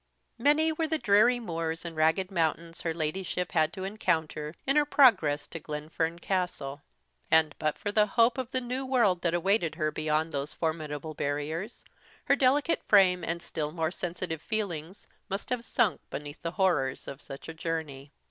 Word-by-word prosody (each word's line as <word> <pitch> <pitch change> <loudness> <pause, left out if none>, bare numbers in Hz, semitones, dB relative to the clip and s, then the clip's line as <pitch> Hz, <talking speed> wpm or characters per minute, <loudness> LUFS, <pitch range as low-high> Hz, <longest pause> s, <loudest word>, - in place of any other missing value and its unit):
MANY 300 +5 +4
were 320 +1 -1
the 320 0 0
dreary 240 +1 +4
muirs 165 -5 -3
and 165 -1 -6
rugged 160 +5 +2
mountains 165 -1 -1
her 165 - -1
Ladyship 170 +3 -2
had 160 -1 +2
to 185 - -6
encounter 160 -6 -1
in 275 - +2
her 300 - +6
progress 190 - +4
to 165 - -6
Glenfern 160 +2 -3
Castle; 175 -6 -2 0.5
and, 160 -2 +4
but 155 -1 0
for 205 - -3
the 210 0 +4
hope 230 +4 +3
of 255 -2 -3
the 255 0 -1
new 250 +2 -3
world 235 -9 +2
that 170 -1 +1
awaited 175 -2 +1
her 155 -2 0
beyond 155 +1 0
those 140 0 -4
formidable 155 -1 -3
barriers, 155 +9 -3 0.4
her - - +4
delicate 280 +4 +2
frame 185 -3 +5
and 170 +1 -3
still 150 -2 -3
more 160 0 -1
sensitive 175 -3 -4
feelings 190 -5 -3 0.2
must 195 +5 -4
have 245 -2 -1
sunk - - +1
beneath 145 +1 -7
the 165 +1 -4
horrors 155 -10 +1
of 140 +1 -7
such 135 -1 -9
a 160 - -6
journey. 160 -4 -4
170 Hz, 175 wpm, -29 LUFS, 155-210 Hz, 0.5 s, her